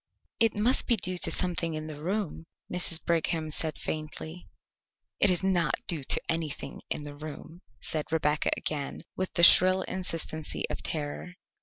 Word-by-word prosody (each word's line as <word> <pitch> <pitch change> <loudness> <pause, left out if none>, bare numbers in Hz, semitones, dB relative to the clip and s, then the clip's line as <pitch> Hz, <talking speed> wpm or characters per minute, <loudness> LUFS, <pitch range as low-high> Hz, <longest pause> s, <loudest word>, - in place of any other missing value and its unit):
"It 225 -1 +3
must 225 +5 +3
be 240 - +4
due 185 -3 -2
to - - +6
something 170 -3 +2
in 155 0 -5
the 150 -1 -9
room," 180 -2 -3 0.3
Mrs. 175 -2 +5
Brigham 165 -1 -1
said 155 0 +1
faintly. 155 +2 -6 0.7
"It - - +4
is 180 +1 +1
not 180 -4 +1
due 165 -5 0
to - - +4
anything 160 -3 -4
in 150 - -2
the 145 0 -8
room," 155 +3 -10 0.2
said 155 0 -3
Rebecca 155 -1 +1
again 145 -3 -4
with 185 - -3
the 170 - +1
shrill 185 +2 +7
insistency 165 -4 -4
of - - -4
terror. 155 +3 -5
165 Hz, 160 wpm, -28 LUFS, 155-185 Hz, 0.7 s, shrill